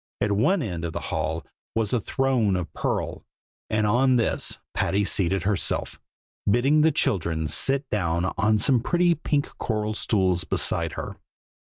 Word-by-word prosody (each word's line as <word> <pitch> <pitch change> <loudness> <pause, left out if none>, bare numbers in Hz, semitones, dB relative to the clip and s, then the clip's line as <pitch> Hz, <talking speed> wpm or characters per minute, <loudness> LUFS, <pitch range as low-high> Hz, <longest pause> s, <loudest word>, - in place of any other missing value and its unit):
At 105 - 0
one 145 - +2
end 90 -7 -4
of 85 -1 -3
the - - -3
hall 80 +1 -2 0.3
was 110 -1 0
a 120 - +1
throne 125 -7 +1
of 90 -3 -4
pearl, - - -2 0.5
and 110 0 +1
on 125 +5 +3
this 115 - 0 0.2
Patty 100 +1 +1
seated 95 -1 +1
herself, 100 -5 -1 0.5
bidding 135 +8 +3
the 160 +1 +4
children 80 - 0
sit 135 - +1
down 90 -2 0
on 110 +2 +2
some 125 +4 +3
pretty 175 +7 +2
pink 145 -2 -2
coral 110 -1 -1
stools 95 -5 +1
beside - - 0
her. - - -6
105 Hz, 155 wpm, -25 LUFS, 95-130 Hz, 0.5 s, the